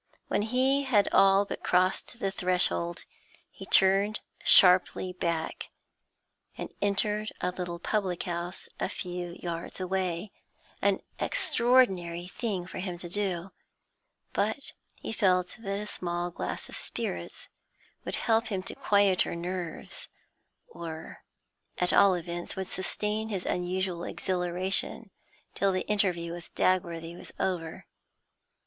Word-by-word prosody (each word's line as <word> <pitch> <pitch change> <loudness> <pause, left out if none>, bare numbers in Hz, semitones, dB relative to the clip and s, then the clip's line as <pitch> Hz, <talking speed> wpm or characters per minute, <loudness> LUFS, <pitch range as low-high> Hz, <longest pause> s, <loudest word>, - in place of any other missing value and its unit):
When - - +2
he 260 +5 +2
had 235 -8 +3
all 195 +1 +6
but - - -5
crossed 185 +6 +1
the 195 - 0
threshold, 175 - +1 0.5
he - - -10
turned 195 +3 +5 0.2
sharply 180 0 +6
back, 170 -3 -2 0.9
and - - -6
entered 210 +1 +1
a 180 - 0
little 175 -1 -4
public 185 -1 -1
house 175 +1 -4
a - - 0
few 180 -3 -4
yards 170 +1 -5
away; 185 0 -1 0.5
an - - +2 0.2
extraordinary 195 - +2
thing 195 -3 -3
for 180 - -7
him 180 -2 -3
to 175 - -5
do, 190 -1 0 0.8
but 220 +7 -1 0.2
he - - -6
felt 185 -4 +2
that 200 -3 -3
a 210 - -4
small 175 -3 -2
glass - - -3
of - - -7
spirits 85 -1 -5 0.6
would - - -2
help 225 +1 +2
him 195 -4 -2
to - - -6
quieter 200 -4 +3
nerves, 175 -1 -3 0.6
or 160 -2 -8 0.6
at 180 - +1
all 200 -2 +6
events 175 0 -3
would 190 - -2
sustain 210 +4 -1
his 195 -4 -2
unusual 180 -1 -1
exhilaration 185 +4 -1 0.4
till 195 0 +2
the 185 0 -2
interview 180 -5 +1
with 175 -1 -9
Dagworthy 170 -2 +1
was - - -10
over. 165 -4 -2
185 Hz, 125 wpm, -29 LUFS, 175-200 Hz, 0.9 s, all